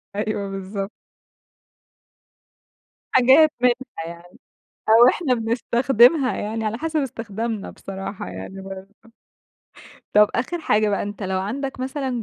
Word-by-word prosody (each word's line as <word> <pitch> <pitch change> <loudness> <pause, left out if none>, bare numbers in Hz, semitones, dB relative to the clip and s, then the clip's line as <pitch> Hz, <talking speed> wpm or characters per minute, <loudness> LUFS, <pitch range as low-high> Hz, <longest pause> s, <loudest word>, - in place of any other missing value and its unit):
أيوه 205 -1 -2
بالضبط. 195 +1 -5 2.2
حاجات 265 +5 +6
منها 250 -1 +4 0.3
يعني 170 +1 -12 0.5
أو 230 +3 +8
إحنا 265 -3 +1
بنستخدمها 240 +4 +3
يعني 220 +2 -3
على 220 +2 -2
حسب 320 -1 -1
استخدامنا 225 -4 -4
بصراحة 195 +1 -7
يعني 95 - -8
برضو. 195 +1 -9 1.2
طب 210 0 +6
آخر 260 +9 -1
حاجة 215 -6 +2
بقى 200 - 0
أنت 205 +1 -6
لو 190 -1 -1
عندك 265 +7 -4
مثلًا 260 -2 -3
225 Hz, 115 wpm, -22 LUFS, 195-255 Hz, 2.2 s, أو